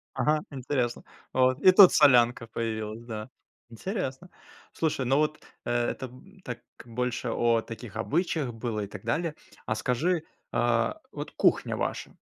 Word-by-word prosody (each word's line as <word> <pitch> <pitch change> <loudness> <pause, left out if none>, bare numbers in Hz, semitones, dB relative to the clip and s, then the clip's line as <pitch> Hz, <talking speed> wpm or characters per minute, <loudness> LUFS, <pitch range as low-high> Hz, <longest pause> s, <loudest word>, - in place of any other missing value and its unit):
Ага, 150 0 +2
интересно. 130 -3 -2 0.3
Вот. 130 0 +3
И 185 - +8
тут 185 -1 +9
солянка 120 -5 +5
появилась, 110 -1 -4
да. 110 0 -6 0.4
Интересно. 180 - -4 0.4
Слушай, 150 -5 -1
ну 135 +3 +3
вот, 150 0 +1 0.3
э, - - -1 0.2
это 130 - -6 0.4
так 125 - -5 0.3
больше 125 +1 -2
о 115 0 +2
таких 115 -1 -9
обычаях 150 0 -1
было 115 -2 -3
и 100 - -4
так 100 -1 -10
далее. 165 -2 -1 0.3
А 110 - -1
скажи, 155 +9 0 0.3
а 115 -1 +1
вот - - -6
кухня - - +2
ваша, - - -3
125 Hz, 140 wpm, -28 LUFS, 115-150 Hz, 0.4 s, тут